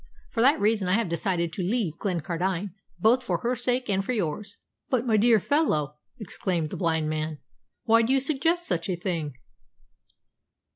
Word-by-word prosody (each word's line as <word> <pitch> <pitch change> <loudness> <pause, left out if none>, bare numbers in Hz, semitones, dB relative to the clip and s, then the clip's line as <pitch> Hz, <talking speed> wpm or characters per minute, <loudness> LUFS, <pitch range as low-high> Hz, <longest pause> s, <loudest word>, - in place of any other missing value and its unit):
For 225 - 0
that 275 +6 +5
reason 210 -2 +1
I 180 - +2
have 225 -5 0
decided 170 -1 -1
to 190 - -4
leave 180 -4 -1
Glencardine, 180 +1 -2 0.3
both 240 +4 +3
for 180 -8 -1
her 240 +1 0
sake 250 +1 0
and 195 -2 0
for 250 - -2
yours." 200 +1 -3 0.3
"But, 250 -2 +1
my 225 -3 +2
dear 225 +1 +5
fellow," 155 - 0 0.2
exclaimed 180 -6 -3
the - - -4
blind 160 -3 0
man, 155 0 -3 0.5
"why 230 0 +4
do 230 +3 0
you 270 - +4
suggest 320 +5 +1
such 170 -1 -1
a 185 - 0
thing?" 170 -6 -3
195 Hz, 175 wpm, -26 LUFS, 170-240 Hz, 0.5 s, that